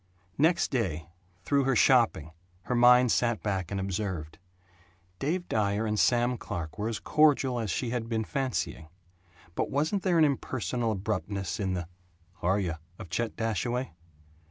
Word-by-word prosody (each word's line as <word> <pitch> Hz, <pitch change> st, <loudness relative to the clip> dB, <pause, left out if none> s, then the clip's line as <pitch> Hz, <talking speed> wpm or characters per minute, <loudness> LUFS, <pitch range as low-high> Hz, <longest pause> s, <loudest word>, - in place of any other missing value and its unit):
Next 165 Hz, +4 st, +3 dB
day, 85 Hz, -, -2 dB, 0.3 s
through 140 Hz, +2 st, +2 dB
her 135 Hz, -1 st, +2 dB
shopping, 115 Hz, -, +3 dB, 0.3 s
her 125 Hz, -, -2 dB
mind 125 Hz, 0 st, +6 dB
sat 120 Hz, -2 st, +1 dB
back 95 Hz, -4 st, -2 dB
and 100 Hz, -, -3 dB
observed. 95 Hz, -5 st, -4 dB, 0.8 s
Dave 175 Hz, +6 st, -1 dB
Dyer 105 Hz, 0 st, 0 dB
and 105 Hz, -1 st, -1 dB
Sam 120 Hz, 0 st, +2 dB
Clark 80 Hz, +2 st, -6 dB
were 105 Hz, +2 st, -1 dB
as 110 Hz, -, -3 dB
cordial 140 Hz, -5 st, +3 dB
as 110 Hz, -3 st, -3 dB
she 115 Hz, +6 st, -2 dB
had 115 Hz, -2 st, -3 dB
been 110 Hz, -1 st, 0 dB
fancying; 130 Hz, -, -3 dB, 0.7 s
but -, -, -1 dB
wasn't 155 Hz, +8 st, 0 dB
there 180 Hz, -3 st, +2 dB
an 160 Hz, -, +6 dB
impersonal 125 Hz, -4 st, -1 dB
abruptness 95 Hz, -2 st, -3 dB
in 95 Hz, -2 st, -1 dB
the 90 Hz, -, -2 dB
"H' -, -, -8 dB, 0.6 s
are 95 Hz, +4 st, +2 dB
yuh?" 85 Hz, -5 st, -2 dB, 0.2 s
of 90 Hz, -, -10 dB
Chet 120 Hz, +3 st, -2 dB
Dashaway? 120 Hz, +2 st, -2 dB
115 Hz, 155 wpm, -28 LUFS, 95-130 Hz, 0.8 s, mind